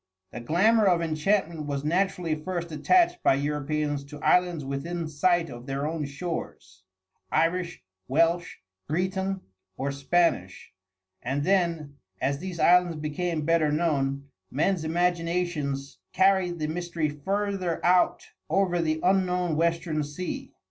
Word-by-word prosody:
The 120 - -6
glamour 200 - +3
of 175 -2 +3
enchantment 160 0 0
was 140 -1 -2
naturally 180 0 0
first 170 +2 -4
attached 350 - +3
by - - +4
Europeans 145 0 -1
to 150 +1 -10
islands 175 -5 +2
within 160 +5 -3
sight 170 +3 +2
of 120 0 -10
their 135 +1 -2
own 155 -1 -2
shores 140 - -6 0.5
Irish, 170 +1 0 0.2
Welsh, 165 +5 +1 0.3
Breton, 190 +3 -1 0.4
or 140 +1 -2
Spanish, 140 - 0 0.5
and 135 +3 -2
then, 165 -6 0 0.2
as 140 +2 0
these 180 -1 -6
islands 175 -1 +4
became 155 +1 -2
better 165 -2 +3
known, 140 -3 0 0.2
men's 160 +5 0
imaginations 165 -4 -1
carried 190 -2 +3
the 155 - -2
mystery 170 0 -2
further 190 +3 -2
out 180 0 +3 0.2
over 175 0 +2
the 155 -1 0
unknown 180 -3 +2
western 165 -1 0
sea. 145 +5 -5
165 Hz, 125 wpm, -27 LUFS, 150-180 Hz, 0.5 s, by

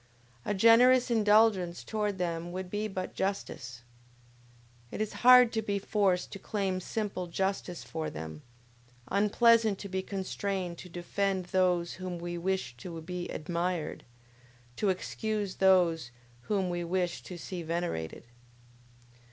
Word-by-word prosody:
A 205 - 0
generous 245 +4 +6
indulgence 210 -5 +3
towards 210 -2 -2
them 170 -1 -2
would 185 0 -5
be 210 +1 -1
but 190 -2 -5
justice! 125 -11 -4 1.1
It - - -6
is 215 -1 -2
hard 250 -1 +8
to 220 - +1
be 205 -2 -1
forced 195 -2 +1
to 195 - -7
claim 195 -2 -2
simple 195 -1 -3
justice 190 0 -2
for 160 -1 -4
them; 80 0 -7 0.7
unpleasant 220 +1 +4
to 200 - -7
be 190 0 -1
constrained 190 -2 -3
to 180 - -10
defend 185 +2 -1
those 180 -2 +1
whom 185 -1 -5
we 175 0 -5
wish 175 -8 -2
to 165 +6 -7
be 175 +2 -5
admired, 170 0 -3 0.7
to 205 - +1
excuse 205 +1 -2
those 175 -7 +4 0.4
whom 195 -4 +1
we 175 0 -2
wish 175 0 -1
to 180 - -8
see 175 +1 -6
venerated! 165 - -3
185 Hz, 135 wpm, -30 LUFS, 175-205 Hz, 1.1 s, hard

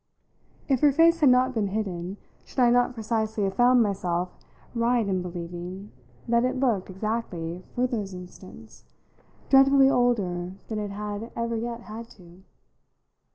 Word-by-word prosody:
If 270 -3 +2
her 290 +1 +5
face 330 +3 +4
had 295 -4 +5
not 255 +1 +4
been 215 -4 0
hidden, 190 -2 -4 0.3
should - - -19
I 245 -2 +5
not 245 +1 +2
precisely 220 -1 -1
have 195 -1 0
found 245 +1 +5
myself 180 -3 -1 0.4
right 235 -1 +1
in 185 -2 0
believing 180 +2 -7 0.4
that 235 0 +3
it 255 - 0
looked, 235 -9 0
exactly, 185 -4 -4
for 250 - +2
those 220 -6 -3
instants, 185 +4 -12 0.7
dreadfully 270 0 +6
older 190 -9 0 0.2
than 215 -1 -2
it 205 -1 -3
had 210 +2 -5
ever 235 0 -2
yet 235 +1 -4
had 225 +1 -9
to? 175 -1 -16
220 Hz, 150 wpm, -26 LUFS, 185-245 Hz, 0.7 s, dreadfully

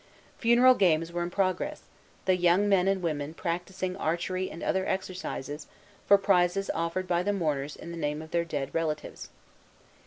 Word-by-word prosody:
Funeral 240 +2 +6
games 165 -6 +2
were 175 0 -2
in 175 - -2
progress, 185 0 -1 0.4
the 185 - +4
young 180 +3 +3
men 190 -2 +3
and 195 -2 +1
women 155 -1 -2
practising 180 +2 -3
archery 185 +2 -1
and 165 - -8
other 190 - +1
exercises, 180 -6 -4 0.4
for 200 - +8
prizes 195 0 +2
offered 170 +3 -2
by 175 -1 +2
the 205 +3 0
mourners 150 -7 -1
in 170 - -9
the 170 - -6
name 150 +1 -1
of 160 0 -10
their 170 0 +1
dead 145 -5 -4
relatives. 155 -2 -3
175 Hz, 165 wpm, -28 LUFS, 165-190 Hz, 0.4 s, for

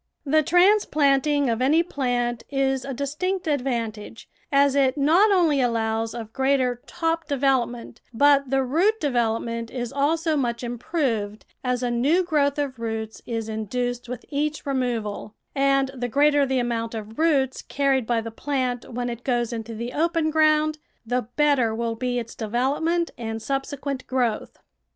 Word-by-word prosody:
The 310 +2 +4
transplanting 300 -5 +3
of 230 0 0
any 305 +6 +4
plant 245 -7 -1
is 270 -2 0
a 275 - -5
distinct 305 +8 -2
ad 290 -4 +1
vantage, 230 -4 -4 0.2
as 280 -1 +4
it 275 -1 +2
not 330 +9 +4
only 330 -8 +3
allows 225 -2 0
of 225 -2 -7
greater 265 -2 +1
top 330 -1 -2
de 285 -2 -1
velopment, 245 -3 0
but 280 +2 +4
the 270 0 +2
root 355 - +2
development 230 -4 -1
is 245 -2 -5
also 315 +3 +1
much 240 -4 -1
improved, 235 -4 -2 0.2
as 250 -1 -1
a 245 - 0
new 285 +10 +2
growth 295 -5 +1
of 275 -4 -3
roots 220 -1 -4
is 225 -2 -3
induced 245 +3 -3
with 250 - -6
each 300 +1 -2
removal; 235 -6 -2 0.2
and 275 -1 +2
the 245 -2 -3
greater 290 +2 +3
the 265 0 0
amount 235 -2 -2
of 220 +2 -7
roots 280 -5 +2
carried 270 -4 0
by 235 -2 +1
the 230 0 -7
plant 255 -1 -2
when 245 +1 -3
it 240 0 -5
goes 240 -2 0
into 225 0 -5
the 235 +3 -5
open 330 0 +1
ground, 310 0 +3 0.3
the 245 -1 -1
better 280 -7 +3
will 230 0 -1
be 245 +2 -2
its 230 -1 -4
development 280 +10 0
and 225 -1 -4
subsequent 275 +2 -4
growth. 245 -4 -1
260 Hz, 160 wpm, -24 LUFS, 235-290 Hz, 0.3 s, The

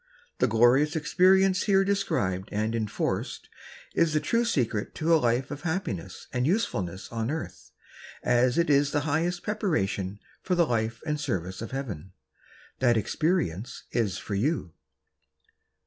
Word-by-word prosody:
The - - +4
glorious 120 +7 +4
experience 185 +4 +3
here 195 -2 +4
described 100 - -1
and 110 +2 -1
enforced 110 -3 -2 0.4
is 165 -2 +2
the 155 - +3
true 230 +11 +1
secret 115 - -1
of 155 - -2
a 165 - +6
life 125 0 0
of 145 0 -6
happiness 140 - -4
and 125 +1 +1
usefulness 95 - -1
on 115 0 -2
earth 160 +2 -5 0.5
as 125 +2 +3
it 170 -2 +3
is 140 0 +3
the 145 - +2
highest 165 +4 -1
pre 210 - -1
paration 100 - -1 0.2
for 185 - 0
the 170 -1 +4
life 115 -3 -1
and 150 -1 -1
service 95 - -3
of 115 - -5
Heaven. 100 - -6 0.7
That 120 -3 +4
experience 125 - -1
is 105 -5 0
for 105 - -6
you. 105 - -1
135 Hz, 145 wpm, -27 LUFS, 110-165 Hz, 0.7 s, a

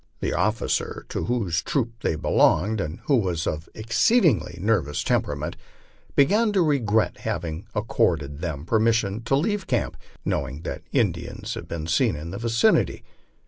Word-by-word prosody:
The - - -1
officer 110 +1 -1
to - - -2
whose 100 -9 0
troop 120 - -1
they - - 0
belonged, 100 +6 +2
and 80 +1 -5
who 140 - +4
was 90 -7 -1
of 80 +2 -3
an - - -7
exceedingly 120 - +3
nervous 90 -8 0
temperament, - - -1 0.6
began 210 +10 +4
to 190 -3 +4
regret 115 -8 +1
having 85 +3 -4
accorded 80 -9 0
them 80 -4 -4
permission 110 0 +2
to 135 - +2
leave 190 +5 0
camp, 120 -4 0 0.3
knowing 70 +1 -2
that - - -5
Indians - - -1
had - - -7
been 80 -2 -4
seen 95 +5 +2
in 80 +3 -6
the 100 - -5
vicinity. 115 -1 +2
105 Hz, 150 wpm, -24 LUFS, 80-120 Hz, 0.6 s, who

